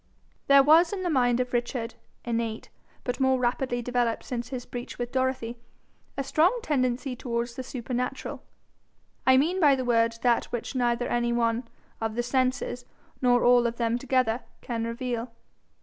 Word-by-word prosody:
There 275 0 +7
was 325 +4 +6
in 390 -2 -3
the 350 - 0
mind 245 -3 +3
of 250 0 -2
Richard, 240 -1 -2 0.3
innate, 230 -2 -2 0.3
but 245 +1 -3
more 265 -1 +3
rapidly 245 0 -1
developed 245 -1 0
since 240 -2 -4
his 255 -2 -5
breach 245 0 -7
with 245 0 -4
Dorothy, 260 -3 -1 0.6
a 275 - 0
strong 345 - +2
tendency 255 -2 0
towards 235 -1 -3
the 260 - -5
supernatural 250 0 -4 0.9
I 260 0 +7
mean 335 +8 +2
by 290 -5 +6
the 260 -1 -3
word 230 -1 +2
that 240 -2 +3
which 240 +2 -5
neither 245 -1 +1
any 240 0 0
one 235 0 0 0.3
of 225 -1 -2
the 240 - 0
senses 255 0 0 0.4
nor 245 -1 +4
all 245 -1 +5
of 230 - -3
them 235 0 0
together, 255 -2 +1 0.2
can 230 -2 -3
reveal. 235 0 -3
245 Hz, 165 wpm, -27 LUFS, 235-260 Hz, 0.9 s, There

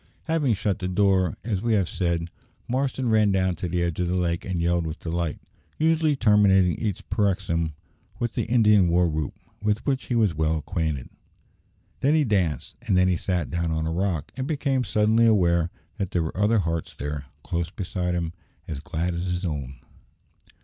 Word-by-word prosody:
Having 155 -8 +1
shut 100 0 -1
the 90 - -2
door, 95 -2 +2
as 105 -5 -1
we 115 0 +1
have 100 -5 +2
said, 85 -2 -1 0.4
Marston 130 0 -1
ran 110 -2 +4
down 95 -1 +2
to 90 +2 -4
the 85 +1 0
edge 85 -1 -2
of 90 - +1
the 90 - 0
lake 85 -2 -1
and 90 -2 -2
yelled 85 0 +1
with 80 +1 -6
delight 85 -1 -2 0.4
usually 160 -1 +3
terminating 100 -6 +4
each 105 -4 -3
paroxysm 90 -6 0 0.4
with 120 -1 -1
the - - -1
Indian 105 -5 +4
war 85 +1 +3
whoop, 75 -3 -2 0.3
with 105 +1 0
which 135 -2 0
he 125 - -1
was 110 -6 +3
well 80 +1 +1
acquainted. 80 -4 -2 0.9
Then 145 +3 +3
he 155 - +4
danced, 95 - -1
and 110 -7 +1
then 90 0 +4
he 90 - +2
sat 90 -2 -2
down 85 -1 -1
on 80 0 -1
a 80 - -1
rock, 90 -2 -1
and 130 0 -3
became 140 -4 0
suddenly 110 +1 +3
aware 85 -6 +3 0.3
that 95 - -1
there 85 -2 0
were 80 - -5
other 105 +4 +3
hearts 85 -4 -2
there, 75 -1 -4 0.2
close 85 -1 -2
beside 90 -2 -3
him, 85 -1 -2 0.3
as 75 - -4
glad 80 +4 -2
as 85 +2 -3
his 90 +1 -2
own. 70 -5 -4
90 Hz, 190 wpm, -25 LUFS, 85-110 Hz, 0.9 s, ran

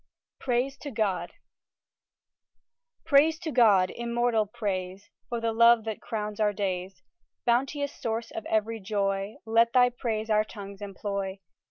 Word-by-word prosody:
PRAISE 265 +2 -1
TO 290 - -6
GOD 215 -7 -1 1.7
Praise 310 +1 +5
to 325 -2 -5
God, 205 -8 +5
immortal 235 -2 0
praise, 195 -2 -4 0.2
For 240 -1 -2
the 230 0 -1
love 235 0 +6
that 220 -1 -5
crowns 210 -1 -4
our 210 -1 +2
days 185 -1 -3 0.4
Bounteous 275 +4 +1
source 225 0 -4
of 220 - -6
every 220 +1 0
joy, 195 0 -1
Let 230 +1 +3
Thy 245 -1 +5
praise 225 -2 -3
our 215 0 +4
tongues 200 -2 -10
employ! 200 -1 -4
220 Hz, 135 wpm, -27 LUFS, 200-240 Hz, 1.7 s, love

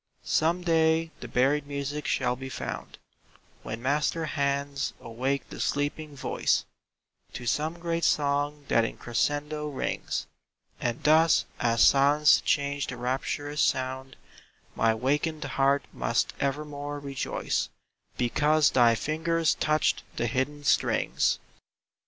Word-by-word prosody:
Some 170 +3 +1
day 160 -1 +2
the - - -7
buried 140 +3 +1
music 145 +1 -4
shall 125 -2 +1
be 130 +1 -7
found - - -6 0.6
When 115 +2 -6
master 150 +4 +1
hands 140 -1 -1
awake 130 +4 -2
the - - -8
sleeping 145 +1 -2
voice 130 - 0 0.7
To 120 - -7
some 155 +7 -1
great 170 0 -2
song 145 0 +1
that 115 - +3
in 115 - -3
crescendo 145 +5 -1
rings; 145 -3 -3 0.5
And 120 -1 -2
thus, 160 +2 +5
as 115 -1 +3
silence 145 +2 +5
changed 140 -1 0
to 125 - -5
rapturous 135 +4 -2
sound, 130 0 -1 0.6
My 115 -1 +2
wakened 150 +6 -1
heart 140 0 +2
must - - 0
evermore 145 +1 -3
rejoice 140 -2 -2 0.5
Because 150 +5 +3
thy 120 -2 +5
fingers 160 +4 0
touched 155 0 +1
the 120 - -1
hidden 130 +5 -2
strings. - - +2
145 Hz, 120 wpm, -27 LUFS, 130-150 Hz, 0.7 s, thus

